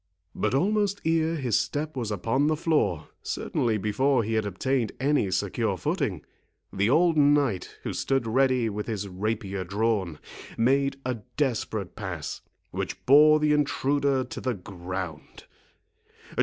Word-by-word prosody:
But 110 Hz, +3 st, 0 dB
almost 205 Hz, +5 st, +1 dB
ere 160 Hz, 0 st, +2 dB
his 130 Hz, -8 st, +1 dB
step 150 Hz, +1 st, -3 dB
was 120 Hz, -5 st, -2 dB
upon 115 Hz, +8 st, +1 dB
the 155 Hz, -, +2 dB
floor, 150 Hz, -, 0 dB
certainly 115 Hz, -3 st, -1 dB
before 115 Hz, +5 st, +1 dB
he 110 Hz, +2 st, -2 dB
had 110 Hz, -2 st, +1 dB
obtained 120 Hz, +5 st, -1 dB
any 140 Hz, -7 st, +2 dB
secure 90 Hz, 0 st, -1 dB
footing, -, -, -2 dB, 0.5 s
the 100 Hz, +3 st, +1 dB
old 165 Hz, +4 st, +4 dB
knight, 145 Hz, -9 st, +2 dB
who -, -, -3 dB
stood 135 Hz, -3 st, 0 dB
ready 130 Hz, 0 st, +2 dB
with 105 Hz, -1 st, -4 dB
his 105 Hz, -3 st, -3 dB
rapier 100 Hz, 0 st, -3 dB
drawn, 100 Hz, -3 st, -1 dB, 0.4 s
made 135 Hz, +4 st, +2 dB
a 125 Hz, -2 st, -2 dB, 0.2 s
desperate 110 Hz, -8 st, -1 dB
pass, 90 Hz, -7 st, -5 dB, 0.3 s
which -, -, -5 dB
bore 155 Hz, +3 st, +7 dB
the 150 Hz, 0 st, +3 dB
intruder 140 Hz, -2 st, +1 dB
to 125 Hz, -, -7 dB
the 125 Hz, -2 st, -1 dB
ground. 90 Hz, -4 st, -7 dB
120 Hz, 140 wpm, -26 LUFS, 100-145 Hz, 0.5 s, bore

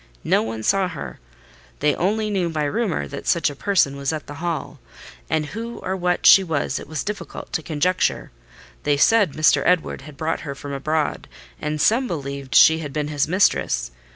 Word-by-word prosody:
No -, -, +3 dB
one 110 Hz, 0 st, -5 dB
saw 195 Hz, -, +2 dB
her: 160 Hz, -6 st, -7 dB, 0.6 s
they 150 Hz, 0 st, +2 dB
only 215 Hz, +4 st, 0 dB
knew 185 Hz, -4 st, 0 dB
by 155 Hz, -2 st, -2 dB
rumour 170 Hz, -, -1 dB
that -, -, -8 dB
such -, -, +2 dB
a -, -, -10 dB
person 165 Hz, -5 st, +1 dB
was 140 Hz, 0 st, -2 dB
at 155 Hz, -1 st, -5 dB
the 145 Hz, -, -9 dB
Hall; 170 Hz, -2 st, -4 dB, 0.5 s
and 155 Hz, -1 st, 0 dB
who 230 Hz, +8 st, -6 dB
or 190 Hz, -, -3 dB
what 180 Hz, -1 st, -1 dB
she 195 Hz, -, +9 dB
was 150 Hz, -5 st, -2 dB
it -, -, -10 dB
was 155 Hz, 0 st, -4 dB
difficult 210 Hz, 0 st, -7 dB
to 160 Hz, -, 0 dB
conjecture. 165 Hz, +4 st, 0 dB, 0.5 s
They 145 Hz, -1 st, +1 dB
said 205 Hz, 0 st, +4 dB
Mr. 155 Hz, 0 st, +3 dB
Edward 180 Hz, -5 st, +1 dB
had 145 Hz, 0 st, -12 dB
brought 160 Hz, +1 st, -1 dB
her 140 Hz, -2 st, -6 dB
from 140 Hz, +1 st, -7 dB
abroad, 155 Hz, +2 st, -2 dB, 0.3 s
and 150 Hz, 0 st, -2 dB
some 230 Hz, -, +3 dB
believed 140 Hz, -, -5 dB
she 160 Hz, 0 st, +7 dB
had 150 Hz, -3 st, -6 dB
been 150 Hz, -1 st, -2 dB
his 145 Hz, -1 st, 0 dB
mistress. 160 Hz, -, +1 dB
155 Hz, 190 wpm, -22 LUFS, 145-185 Hz, 0.6 s, she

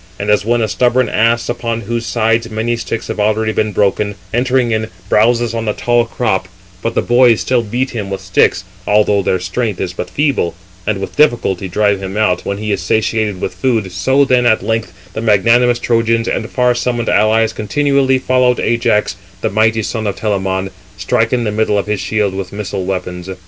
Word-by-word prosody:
And 100 Hz, +1 st, -1 dB
as 105 Hz, 0 st, +3 dB
when 120 Hz, +1 st, +1 dB
a -, -, 0 dB
stubborn 120 Hz, +6 st, +1 dB
ass, 115 Hz, +1 st, +1 dB
upon 115 Hz, -1 st, -3 dB
whose 115 Hz, +2 st, -3 dB
sides 115 Hz, 0 st, +1 dB
379 110 Hz, -, -10 dB
many 115 Hz, +2 st, 0 dB
sticks 115 Hz, -1 st, -4 dB
have -, -, -4 dB
already 110 Hz, +1 st, +1 dB
been 110 Hz, 0 st, 0 dB
broken, 105 Hz, +1 st, 0 dB, 0.2 s
entering 125 Hz, 0 st, +1 dB
in, 110 Hz, 0 st, -1 dB, 0.2 s
browses 115 Hz, +1 st, +2 dB
on 115 Hz, -1 st, -3 dB
the 105 Hz, -, 0 dB
tall 120 Hz, -1 st, +1 dB
crop, 95 Hz, -6 st, -1 dB, 0.3 s
but 115 Hz, -, -3 dB
the -, -, +1 dB
boys 120 Hz, -2 st, +4 dB
still 125 Hz, -2 st, +1 dB
beat 120 Hz, +4 st, -2 dB
him 105 Hz, -5 st, -4 dB
with 95 Hz, -, -3 dB
sticks, 95 Hz, -, +1 dB, 0.2 s
although 105 Hz, -1 st, +3 dB
their 95 Hz, 0 st, 0 dB
strength 100 Hz, +3 st, -3 dB
is 90 Hz, -2 st, -3 dB
but -, -, -5 dB
feeble, 140 Hz, -, 0 dB, 0.3 s
and 110 Hz, -, +1 dB
with 95 Hz, -, -6 dB
difficulty 115 Hz, -10 st, +2 dB
drive 100 Hz, +1 st, +1 dB
him 95 Hz, +1 st, -5 dB
out, 90 Hz, -5 st, +1 dB
when 100 Hz, -, -2 dB
he 105 Hz, 0 st, -3 dB
is 100 Hz, -1 st, -1 dB
satiated 105 Hz, +1 st, 0 dB
with -, -, -3 dB
food, 115 Hz, -8 st, -1 dB
so 130 Hz, +10 st, +2 dB
then 125 Hz, -2 st, +3 dB
at 110 Hz, -2 st, +2 dB
length 110 Hz, -5 st, -1 dB, 0.2 s
the 110 Hz, -, -4 dB
magnanimous 115 Hz, +3 st, +3 dB
Trojans 115 Hz, -1 st, +1 dB
and 110 Hz, -, -2 dB
far 125 Hz, -1 st, +2 dB
summoned 120 Hz, -1 st, -2 dB
allies 110 Hz, +1 st, +3 dB
continually 135 Hz, +4 st, +1 dB
followed 125 Hz, -1 st, +2 dB
Ajax, 105 Hz, -5 st, +1 dB, 0.2 s
the -, -, -1 dB
mighty 110 Hz, +2 st, +2 dB
son 110 Hz, 0 st, -3 dB
of 100 Hz, -, -2 dB
Telamon, 95 Hz, -2 st, -2 dB, 0.3 s
striking 115 Hz, +5 st, 0 dB
the 105 Hz, -, -1 dB
middle 105 Hz, -1 st, +1 dB
of 100 Hz, -, -1 dB
his 105 Hz, -1 st, -2 dB
shield 105 Hz, -3 st, 0 dB
with 95 Hz, -1 st, -5 dB
missile 100 Hz, -2 st, -4 dB
weapons. 90 Hz, -1 st, -4 dB
110 Hz, 195 wpm, -15 LUFS, 100-120 Hz, 0.3 s, boys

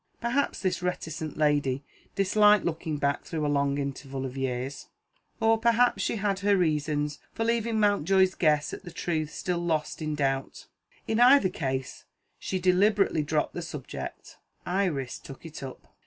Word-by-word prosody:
Perhaps 245 Hz, +4 st, 0 dB
this 185 Hz, -1 st, 0 dB
reticent 160 Hz, -4 st, -4 dB
lady 145 Hz, -3 st, +1 dB, 0.3 s
disliked 210 Hz, +1 st, +4 dB
looking 160 Hz, -2 st, -2 dB
back 140 Hz, 0 st, 0 dB
through 155 Hz, -3 st, -3 dB
a -, -, +1 dB
long 140 Hz, 0 st, +1 dB
interval 135 Hz, -1 st, -4 dB
of 130 Hz, 0 st, -6 dB
years, 135 Hz, +1 st, -3 dB, 0.5 s
or 225 Hz, 0 st, +3 dB
perhaps 235 Hz, +1 st, +3 dB
she -, -, 0 dB
had 200 Hz, -2 st, -1 dB
her 200 Hz, 0 st, +3 dB
reasons 150 Hz, -3 st, 0 dB
for 225 Hz, -, -2 dB
leaving 230 Hz, -1 st, +1 dB
Mountjoy's 195 Hz, -2 st, +3 dB
guess 150 Hz, -3 st, +2 dB
at -, -, -7 dB
the 175 Hz, -, -8 dB
truth 160 Hz, -2 st, -2 dB
still 180 Hz, -3 st, -2 dB
lost 160 Hz, -2 st, -1 dB
in 155 Hz, -1 st, -2 dB
doubt. 135 Hz, -2 st, -2 dB, 0.4 s
In 220 Hz, -, 0 dB
either 250 Hz, -4 st, +7 dB
case, 135 Hz, -5 st, -4 dB, 0.3 s
she 190 Hz, -, -2 dB
deliberately 190 Hz, 0 st, +3 dB
dropped 150 Hz, 0 st, -1 dB
the 175 Hz, -, -4 dB
subject. 150 Hz, -5 st, -7 dB, 0.3 s
Iris 175 Hz, -9 st, -1 dB
took 135 Hz, +3 st, -12 dB
it 160 Hz, -1 st, -8 dB
up. 135 Hz, -2 st, -9 dB
160 Hz, 155 wpm, -27 LUFS, 145-200 Hz, 0.5 s, either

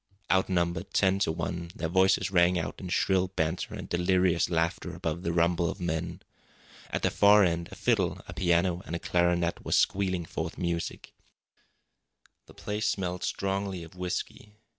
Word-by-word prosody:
Outnumbered 90 Hz, -2 st, 0 dB
ten 95 Hz, 0 st, +3 dB
to 90 Hz, -, +1 dB
one, 85 Hz, +1 st, -4 dB
their 80 Hz, -, -2 dB
voices 95 Hz, +2 st, +3 dB
rang 90 Hz, -1 st, +4 dB
out 80 Hz, -, -4 dB
in 95 Hz, -, -6 dB
shrill 95 Hz, 0 st, +2 dB
banter 85 Hz, -2 st, -2 dB
and -, -, -7 dB
delirious 90 Hz, -1 st, +2 dB
laughter 80 Hz, -1 st, -1 dB
above 80 Hz, +1 st, -3 dB
the 85 Hz, -, -1 dB
rumble 85 Hz, 0 st, +2 dB
of 100 Hz, -, -6 dB
men. 85 Hz, 0 st, -3 dB, 0.7 s
At -, -, -3 dB
the -, -, +2 dB
far 105 Hz, 0 st, +6 dB
end, 85 Hz, -2 st, 0 dB
a -, -, -8 dB
fiddle, -, -, +1 dB
a -, -, -7 dB
piano, 85 Hz, 0 st, +1 dB
and 85 Hz, -, -3 dB
a -, -, -3 dB
clarinet 85 Hz, -1 st, +1 dB
were -, -, -6 dB
squealing 95 Hz, -3 st, +1 dB
forth -, -, -5 dB
music. 85 Hz, -1 st, -3 dB, 1.3 s
The -, -, -16 dB
place 105 Hz, +1 st, -2 dB
smelled 90 Hz, -1 st, -2 dB
strongly 95 Hz, -3 st, -2 dB
of 85 Hz, -, -12 dB
whisky. 90 Hz, +3 st, -5 dB
90 Hz, 160 wpm, -28 LUFS, 85-95 Hz, 1.3 s, far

